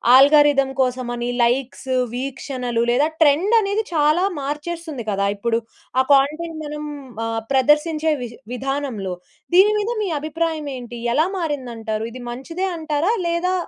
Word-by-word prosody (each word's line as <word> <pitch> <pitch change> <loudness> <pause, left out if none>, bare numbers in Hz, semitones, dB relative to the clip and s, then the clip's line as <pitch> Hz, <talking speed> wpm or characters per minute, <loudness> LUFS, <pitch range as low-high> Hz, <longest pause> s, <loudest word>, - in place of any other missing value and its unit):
Algorithm 280 -1 +6
కోసమని, 245 -1 -1
likes, 260 +1 0 0.2
వీక్షణలు 250 -2 -2
లేదా 280 +5 +3
ట్రెండనేది 400 +8 +3
చాలా 305 +3 +3 0.2
మార్చేస్తుంది 300 -2 -5
కదా! 200 0 +1
ఇప్పుడు. 230 +2 0 0.4
ఆ - - +5
కంటెంట్ 310 +4 +1
మనం 300 0 -5 0.4
ఆహ్, 225 0 -2
ప్రదర్శించే 300 +4 +3
వి 240 - -5 0.2
విధానంలో. 260 -8 -3 0.4
దీని 400 +3 +7
మీద 420 +2 -1
మీ - - -1
అభిప్రాయం 315 0 -2
ఏంటి? 240 -1 -8 0.2
ఎలా 310 +5 +3
మారిందంటారు? 240 -9 -3
ఇది 255 - -9
మంచిదే 330 +10 -4
అంటారా? 315 +4 0 0.2
లేదా 340 +2 0
285 Hz, 125 wpm, -21 LUFS, 250-320 Hz, 0.4 s, దీని